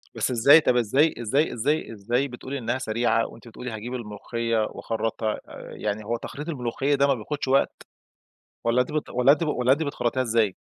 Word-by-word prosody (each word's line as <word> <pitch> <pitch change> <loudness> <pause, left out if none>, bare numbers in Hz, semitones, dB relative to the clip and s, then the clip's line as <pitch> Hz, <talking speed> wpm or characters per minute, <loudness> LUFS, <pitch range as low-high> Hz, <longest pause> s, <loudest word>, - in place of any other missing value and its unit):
بس - - 0
إزاي؟ 140 +7 +7
طب، 125 - +2
إزاي 135 +8 +3
إزاي 135 +8 +1
إزاي 145 +4 0
إزاي 120 +7 0
بتقولي 130 +2 -6
إنها 120 0 -1
سريعة 115 -1 +1
وأنتِ 115 - -14
بتقولي 120 +2 -7
هاجيب 110 +3 -6
الملوخية 115 0 -3
واخرّطها 110 -1 -2
آآ، - - -10
يعني 105 0 -3
هو 120 +2 -1
تخريط 150 +7 -7
الملوخية 135 0 0
ده 140 +1 +3
ما 140 - +4
بياخدش 135 +4 -4
وقت؟ 135 +1 +1 0.8
والّا 120 +2 +3
أنتِ 125 - -1
بت 155 - -2
والّا 125 +3 +5
أنتِ 165 +2 0
ب - - -2
والّا 125 -2 +2
أنتِ 155 +4 +1
بتخرّطيها 130 -3 -1
إزاي؟ 110 -5 +1
125 Hz, 190 wpm, -25 LUFS, 115-140 Hz, 0.8 s, إزاي